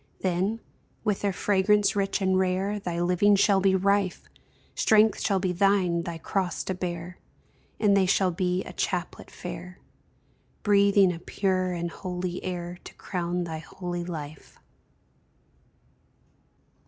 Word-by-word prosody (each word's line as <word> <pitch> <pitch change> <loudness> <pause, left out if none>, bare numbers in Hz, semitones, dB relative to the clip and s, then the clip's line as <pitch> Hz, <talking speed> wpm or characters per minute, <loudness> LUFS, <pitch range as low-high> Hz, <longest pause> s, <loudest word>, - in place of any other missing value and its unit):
Then, 190 +5 0 0.4
with 210 -2 0
their 200 - +1
fragrance 205 +2 +2
rich 195 0 0
and 190 0 +2
rare, 190 +2 0
Thy 175 -3 -3
living 180 +4 +3
shall 195 0 +4
be 190 0 +3
rife, 200 0 +1 0.5
Strength 215 -1 +4
shall 195 - +1
be 185 -1 0
thine 185 -2 +2
thy 170 -1 -5
cross 180 +1 -2
to 190 - -2
bear, 175 -1 -5 0.6
And 205 -2 +4
they 190 -2 +3
shall 185 0 +3
be 180 +1 -1
a - - -9
chaplet 180 -2 -3
fair, 180 +1 -8 0.9
Breathing 200 -2 +4
a 165 - -7
pure 185 0 -1
and 170 -1 -3
holy 180 -1 -5
air, 175 -1 -5
To - - -11
crown 175 -1 -3
thy 160 -2 -5
holy 175 +2 -5
life. 155 -4 -8
185 Hz, 135 wpm, -27 LUFS, 175-200 Hz, 0.9 s, shall